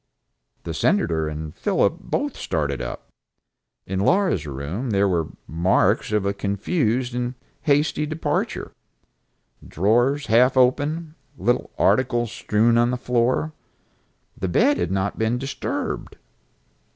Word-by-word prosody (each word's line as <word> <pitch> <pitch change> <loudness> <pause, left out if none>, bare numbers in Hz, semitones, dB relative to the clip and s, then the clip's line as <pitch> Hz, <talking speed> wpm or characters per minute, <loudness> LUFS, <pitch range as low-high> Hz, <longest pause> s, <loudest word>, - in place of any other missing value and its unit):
The - - -4
Senator 80 -2 +1
and 75 0 -6
Philip - - +1
both - - -2
started - - -2
up. - - -6 0.8
In 95 0 -3
Laura's 175 - +2
room 75 - -4
there 100 -1 +3
were 85 -4 +1
the - - -14
marks 95 +6 +2
of 105 -2 +1
a 100 - +1
confused 115 - -1
and 125 +1 -2 0.3
hasty 150 0 +1
departure, 155 +1 -2 1.0
drawers 120 - +2
half 125 +4 +4
open, 150 +5 +2 0.2
little 120 +6 0
articles 120 -3 +2
strewn 115 0 +2
on 120 0 +3
the 125 - -1
floor. 125 +5 0 0.8
The 95 - -3
bed 265 - +3
had - - 0
not 95 +1 -1
been 110 +2 +1
disturbed. 135 +2 -4
120 Hz, 125 wpm, -23 LUFS, 95-130 Hz, 1.0 s, half